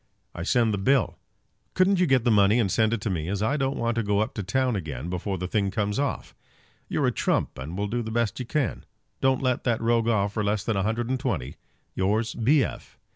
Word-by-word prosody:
"I - - -6
send 115 +4 +2
the 100 - -1
bill. 130 - +1 0.6
Couldn't 185 0 +3
you 180 - +3
get 130 -4 +3
the 120 - +3
money 105 +1 +5
and 100 -5 +1
send 110 +2 +2
it 115 -2 -2
me, 85 -5 -2
as 100 +2 -1
I 110 +6 +1
don't 135 -1 -1
want 115 0 0
to - - +2
go 105 -2 0
up 110 +1 0
to 105 - -4
town 125 +5 0
again 80 -3 -5
before 95 +2 -3
the 90 +1 -3
thing 100 0 0
comes 105 +2 -1
off? 140 -1 -2 0.6
You're - - 0
a - - +3
trump; - - -1
and 80 +7 -6
will 100 - -1
do 120 +4 -2
the 110 - -5
best 115 -1 -1
you 125 - -3
can. 145 -1 -1 0.4
Don't 135 0 +2
let 125 -1 0
that 120 -3 +1
rogue 115 0 +1
off 100 -3 +1
for 105 - -1
less 105 0 0
than 110 0 -1
a 95 - +1
hundred 110 +4 -1
and 130 - 0
twenty. 95 - -3 0.4
Yours, 105 +4 0
B. 135 +5 +3
F." - - -7
110 Hz, 240 wpm, -26 LUFS, 100-125 Hz, 0.6 s, money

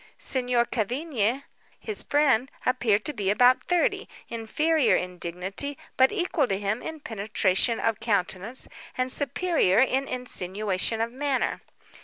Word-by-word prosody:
Signor 250 -2 +2
Cavigni, 245 +1 -1 0.4
his 430 - +1
friend, 270 -4 +2 0.2
appeared 235 -5 +1
to 300 - +1
be 200 -6 -2
about 245 +5 +4
thirty—inferior 310 -3 0
in 180 0 -3
dignity, 190 +12 -2 0.2
but 260 0 +4
equal 350 -8 0
to 195 - -1
him 205 +3 -2
in 320 -1 -7
penetration 210 0 0
of 225 -2 0
countenance, 205 +2 -1 0.3
and 255 0 0
superior 285 - +2
in 265 +2 +2
insinuation 215 -3 -1
of 230 +1 -1
manner. 270 +1 -1
240 Hz, 125 wpm, -26 LUFS, 205-275 Hz, 0.4 s, about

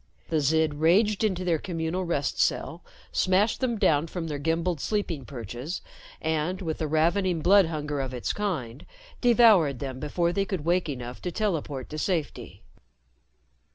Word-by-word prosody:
The 160 - +1
Zid 155 +1 +2
raged 200 +7 +3
into 185 -4 0
their 165 -3 +1
communal 170 +1 -3
rest 145 -5 -1
cell, 165 +2 0 0.3
smashed 190 +4 +2
them 245 -3 0
down 155 -5 +2
from 170 0 -5
their 150 -3 -4
gimbaled 165 +1 -1
sleeping 175 - -2
perches 125 - -6 0.4
and, 160 +3 -1
with 160 -5 -4
the 155 - -1
ravening 170 +3 +1
blood 195 +1 +5
hunger 150 -3 -3
of 130 -1 -4
its 125 -2 -2
kind, 150 - -4 0.3
devoured 220 - +5
them 130 -1 -5
before 170 +4 0
they 195 - +1
could 185 -7 -4
wake 175 -1 +1
enough 125 -3 -6
to 180 - -3
teleport 160 - -2
to 155 - -4
safety. 165 -4 -3
165 Hz, 155 wpm, -27 LUFS, 145-185 Hz, 0.4 s, blood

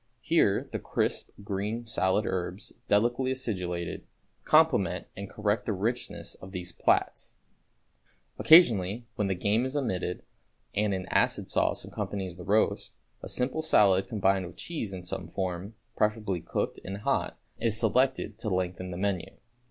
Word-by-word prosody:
Here 160 -12 +2
the - - -3
crisp, - - -2
green 105 +4 -3
salad 105 -2 +1
herbs, 95 +1 -3
delicately 120 +5 +2
acidulated, 90 -10 -3 0.4
complement 155 - +3
and 100 0 -6
correct 105 0 -1
the 110 - +1
richness 115 +6 -2
of 95 - -12
these 90 -2 -4
plats. - - 0 1.0
Occasionally 115 - +6
when 105 -2 -1
the 95 - 0
game 105 +6 +1
is 130 +3 -2
omitted 95 -9 -2 0.5
and 105 -1 +1
an 95 -1 -4
acid - - +1
sauce - - +1
accompanies 95 -4 -4
the 90 - -9
roast, 105 +4 +1 0.3
a - - -7
simple 130 +5 -1
salad 100 -11 +4
combined 95 -3 +1
with - - -12
cheese 150 - -4
in 95 -2 -7
some 90 -1 -5
form, 95 +3 -4 0.2
preferably 105 -4 0
cooked - - -2
and 100 +2 -6
hot, - - 0 0.2
is 110 -1 +1
selected 125 -1 +1
to 110 - -2
lengthen 90 -1 -2
the 90 - -5
menu. 95 -2 -1
100 Hz, 145 wpm, -29 LUFS, 95-115 Hz, 1.0 s, Occasionally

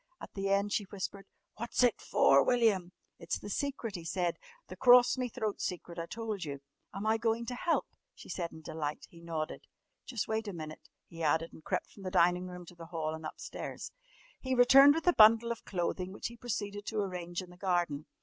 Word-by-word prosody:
At - - -10
the 195 0 -2
end 200 +1 +2
she 205 - 0
whispered 195 0 -6
softly, - - -46
"What's 235 +2 0
it 245 -3 +3
for, 135 0 +5
William?" 220 -8 +2 0.3
"It's 170 - -2
the 205 - -8
secret," 265 -4 -3
he 175 -3 -6
said. 170 +1 -1 0.3
"The - - -9
crorse 245 -1 +7
me 255 -1 -2
throat 215 -2 -3
secret 175 -1 -4
I 165 - -4
told 220 -3 -4
you." 140 -3 -5 0.3
"Am 200 +2 -5
I 220 +1 +2
going 230 0 0
to 250 - -4
help?" 330 +7 0 0.3
she - - -13
said 170 -2 -3
in 160 0 -12
delight. 150 -1 -4
He 170 - -14
nodded. 160 -2 -4 0.4
"Jus' 240 -5 -3
wait 220 0 -1
a 200 - -4
minute," 155 -2 -8 0.2
he 165 0 -10
added, 160 +1 +1
and 160 - -14
crept - - -2
from 200 - -14
the 185 - -4
dining 180 0 +3
room 180 -1 -8
to 175 - -13
the 165 -1 -10
hall 160 -2 -3
and 160 0 -5
upstairs. - - -7 0.5
He 260 0 -1
returned 275 +4 +8
with 325 - -2
a 355 - +5
bundle 230 0 +7
of 235 - -6
clothing 180 0 -2
which 200 - -5
he 235 - -11
proceeded 205 -3 -4
to 220 - -3
arrange 180 -3 -3
in 180 - -13
the - - -14
garden. 175 -6 0
195 Hz, 215 wpm, -32 LUFS, 170-225 Hz, 0.5 s, returned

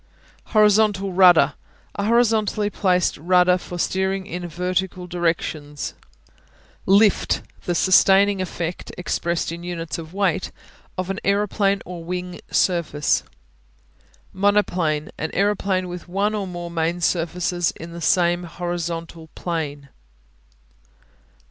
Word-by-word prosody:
Horizontal 210 -3 +3
Rudder 180 -2 +6 0.4
A 200 - -3
horizontally 215 -2 +2
placed 180 -2 +1
rudder 180 +3 +3
for 175 - -7
steering 190 +2 -1
in 180 -2 -5
vertical 180 +2 -2
directions. 165 -4 -2 0.9
Lift 200 +1 +3 0.2
The 175 - 0
sustaining 195 +2 +4
effect, 175 -1 -4
expressed 170 -1 -2
in 170 +1 -7
units 170 -2 -5
of 160 -1 -9
weight 190 -1 0 0.5
of 185 +1 -2
an 195 - -4
aeroplane 200 0 +1
or 175 -2 -7
wing 180 +1 -5
surface. 170 -5 +1 1.1
Monoplane 185 -6 +1
An 160 - -2
aeroplane 195 -2 +1
with 180 0 -8
one 200 +4 0
or 205 -2 -2
more 175 -1 -6
main 170 +1 -1
surfaces 175 +1 0
in 165 +1 -9
the 170 0 -8
same 175 0 +2
horizontal 170 -1 -5
plane. 145 -5 -4
180 Hz, 110 wpm, -22 LUFS, 170-195 Hz, 1.1 s, Rudder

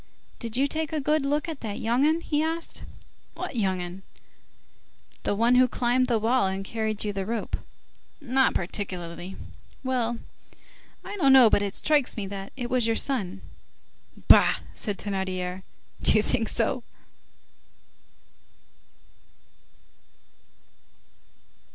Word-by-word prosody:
"Did 230 -1 -2
you 270 - +3
take 310 +2 -2
a 315 - -1
good 295 0 +1
look 295 +3 0
at 320 -4 -5
that 210 -3 -5
young 240 +4 +1
'un?" 320 +2 +2
he 300 -2 0
asked. 325 +1 -2 0.5
"What - - -5
young 190 -5 +1
'un?" 180 +2 -6 1.2
"The - - 0
one 230 +4 +3
who 255 0 +6
climbed 250 +1 +1
the 235 -2 +2
wall 225 0 +2
and 190 +1 -3
carried 220 -1 -2
you 205 - -1
the 195 -1 -2
rope." 225 +2 -3 0.6
"Not 265 -1 +2
particularly." 180 -1 -4 0.5
"Well, 245 -3 0 0.9
I 410 - -6
don't 275 -7 +5
know, 250 -5 +8
but - - +4
it 200 0 -2
strikes 295 -6 +2
me 205 - -2
that 195 0 -7
it 245 -2 -3
was 245 -2 +2
your 225 - +2
son." 200 - -2 0.8
"Bah!" - - +7 0.2
said 205 - -4
Thénardier, 185 -2 -3 0.4
"do - - +4
you 215 - +4
think 225 -1 0
so?" 245 +2 0
230 Hz, 130 wpm, -26 LUFS, 195-265 Hz, 1.2 s, know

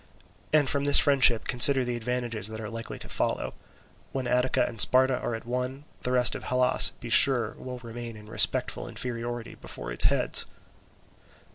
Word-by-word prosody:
And 150 -2 +2
from 140 +1 0
this 145 - +8
friendship 130 -6 +4
consider 130 +1 +4
the 120 0 -4
advantages 120 -3 -3
that 110 0 -8
are 110 0 -8
likely 115 0 -8
to - - -10
follow: - - -3 0.6
when 130 -1 -4
Attica 125 +1 0
and 115 - -9
Sparta 130 +2 +3
are 120 - -4
at 115 - -10
one, 125 +3 -5 0.2
the 125 - -4
rest 125 -1 +2
of - - -7
Hellas, 125 0 +2
be 120 - -9
sure, 120 -4 +5
will 125 -1 -8
remain 120 -1 -9
in 105 0 -15
respectful 110 - +1
inferiority 120 -1 -6
before - - -9
its - - +1
heads." - - +3
125 Hz, 170 wpm, -26 LUFS, 115-130 Hz, 0.6 s, this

